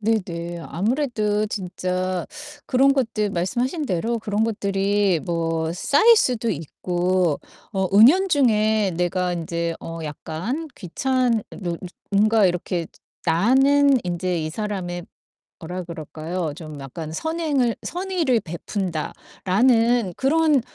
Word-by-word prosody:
네네. 175 -6 -2
아무래도 215 - 0
진짜 185 -2 -2 0.4
그런 270 +1 +4
것들 220 -6 0
말씀하신 245 - -1
대로 230 +2 -1
그런 210 0 0
것들이 200 -3 +1
뭐 165 -1 -1
쌓일 290 - +5
수도 240 - +1
있고 175 0 -1 0.3
어 190 -2 0
은연 330 - +7
중에 220 - +3
내가 180 +1 0
인제 170 0 -2
어 165 0 -6
약간 170 - -4
귀찮 245 +4 0
느 175 -4 -4
즈 185 - -9 0.3
뭔가 215 +1 +4
이렇게 175 -1 -1 0.4
나는 265 +10 +4
인제 180 0 -1
이 155 - -2
사람의 180 -3 -4 0.6
뭐라 180 +2 -5
그럴까요? 165 0 -5
좀 155 -4 -9
약간 155 +4 -7
'선행을 300 - 0
선의를 350 - 0
베푼다.'라는 195 +6 0
그런 300 0 +3
200 Hz, 235 characters per minute, -23 LUFS, 175-245 Hz, 0.6 s, 은연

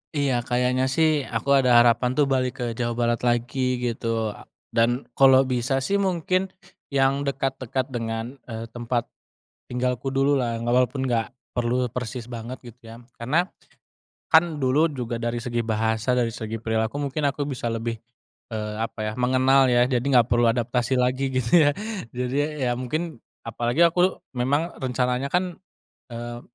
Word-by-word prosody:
Iya, 135 -4 +1
kayaknya 125 +1 +1
sih, 155 0 +2
aku 130 +4 +1
ada 130 -2 +4
harapan 120 +1 +4
tuh 140 +2 +2
balik 130 -2 +1
ke 125 - -1
Jawa 120 0 -1
Barat 120 0 +1
lagi 125 +1 0
gitu. 115 -3 -2
Eee, - - -13 0.3
dan 120 +3 +2
kalau 135 -1 +6
bisa 130 +1 0
sih, 135 +10 -1
mungkin 185 -1 0 0.4
yang 135 0 +2
dekat-dekat 135 -2 -2
dengan, 115 +2 -3
eee, 115 -1 -7
tempat 120 0 -2 0.6
tinggalku 125 +1 -1
dulu 135 +1 +2
lah. 120 -4 -1
Nggak 120 +1 0
walaupun 125 +1 +2
nggak 115 -3 0 0.3
perlu 125 +1 +1
persis 125 0 -5
banget 120 +1 -7
gitu 120 -2 -13
ya. - - -9 0.2
Karena 150 +10 0 0.8
kan 160 -3 +4
dulu 135 +5 +3
juga 120 -3 -3
dari 120 0 -2
segi 120 -1 -3
bahasa, 110 +1 0
dari 120 -2 +1
segi 110 -1 -6
perilaku 110 +5 -1
mungkin 145 +1 -1
aku 140 +1 -1
bisa 125 -3 -4
lebih, 115 0 -2 0.6
eee, 105 -1 -3
apa 110 -1 -3
ya, - - -6
mengenal 130 +2 +4
ya. 125 0 +3
Jadi 125 0 0
nggak 120 -2 +5
perlu 120 0 +3
adaptasi 120 +2 0
lagi 130 +1 0
gitu 130 +6 +4
ya. - - +5 0.4
Jadi 125 +1 -2
ya - - -4 0.2
ya - - +2
mungkin, 155 +4 -3 0.2
apalagi 120 +6 0
aku 180 +2 +1 0.2
memang 145 +7 +1
rencananya 125 0 -1
kan, 180 -1 0 0.5
eee, 120 0 -6
125 Hz, 160 wpm, -24 LUFS, 120-135 Hz, 0.8 s, kalau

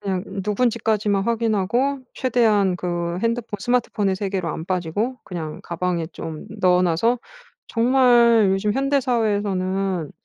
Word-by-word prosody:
그냥 190 -2 -2 0.2
누군지까지만 215 -2 +1
확인하고 235 +4 0
최대한 220 -7 +2
그 175 -1 -3
핸드폰 230 -3 -2
스마트폰의 215 -5 0
세계로 190 -3 -2
안 160 - -4
빠지고 185 +8 -2
그냥 160 -4 -6
가방에 170 -1 -2
좀 160 -2 -8
넣어 180 0 +4
놔서 190 +8 +2 0.5
정말 235 -3 +4
요즘 195 +2 +1
현대사회에서는 205 - 0
205 Hz, 305 characters per minute, -22 LUFS, 180-235 Hz, 0.5 s, 넣어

